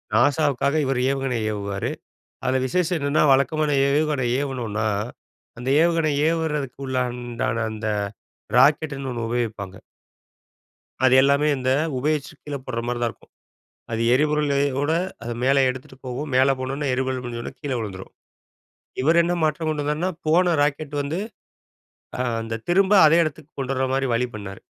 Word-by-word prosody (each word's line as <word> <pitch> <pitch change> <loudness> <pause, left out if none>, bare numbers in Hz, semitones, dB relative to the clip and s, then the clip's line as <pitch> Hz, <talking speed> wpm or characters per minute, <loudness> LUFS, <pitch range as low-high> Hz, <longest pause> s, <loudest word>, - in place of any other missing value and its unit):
நாசாவுக்காக 140 +3 +2
இவரு 130 -2 0
ஏவுகணை 135 -3 -1
ஏவுவாரு. 100 -1 -3 0.5
அதில 130 0 +1
விசேஷம் 180 +5 0
என்னென்னா 140 +1 +2
வழக்கமான 150 +3 +1 0.2
ஏவுகணை 145 -2 +1
ஏவனுனா, 115 -6 -2 0.7
அந்த 125 +2 -4
ஏவுகணை 165 -3 +2 0.2
ஏவுறதுக்குள்ளான 130 -7 -2 0.2
அந்த 110 0 -4 0.7
ராக்கெட்னு 140 0 +3
ஒன்னு 115 -2 -3
உபயோகிப்பாங்க. 110 -5 -3 1.3
அது 130 0 +6
எல்லாமே 140 +2 +3
இந்த 130 0 0 0.3
உபயோகிச்சு 150 +1 -1
கீழ 145 -1 -4
போடுற 115 -2 -2
மாரி 120 0 -1
தான் 120 - +1
இருக்கும். - - -20 0.6
அது 115 0 0
எரிபொருளோட 145 0 +1 0.3
அத 120 - -3
மேல 135 +1 +4
எடுத்துட்டு 130 0 -10
போகும். 135 +4 -4
மேல 135 +1 +4
போனோனே 135 +3 -3
எரிபொருள் 130 0 -2
முடிஞ்சோனே 120 -1 -5
கீழ 145 -2 -3
வுழுந்துரும். 95 -4 -7 0.9
இவர் 160 +5 +4
என்ன 175 +1 0
மாற்றம் 155 +1 0
கொண்டு 150 -2 -1
வந்தார்னா 150 +5 -1 0.2
போன 175 +2 +4
ராக்கெட் 145 0 -1
வந்து, 145 +5 -3 1.0
ஆ - - -6 0.2
அந்த 115 0 -5
திரும்ப 190 +3 +4
அதே 160 +2 +6
எடத்துக்கு 155 -1 -6
கொண்டு 135 0 -1
வர்ற 130 0 0
மாரி 135 0 +1
வழி 125 +2 +1
பண்ணாரு. 100 -2 -8
135 Hz, 135 wpm, -23 LUFS, 125-150 Hz, 1.3 s, அது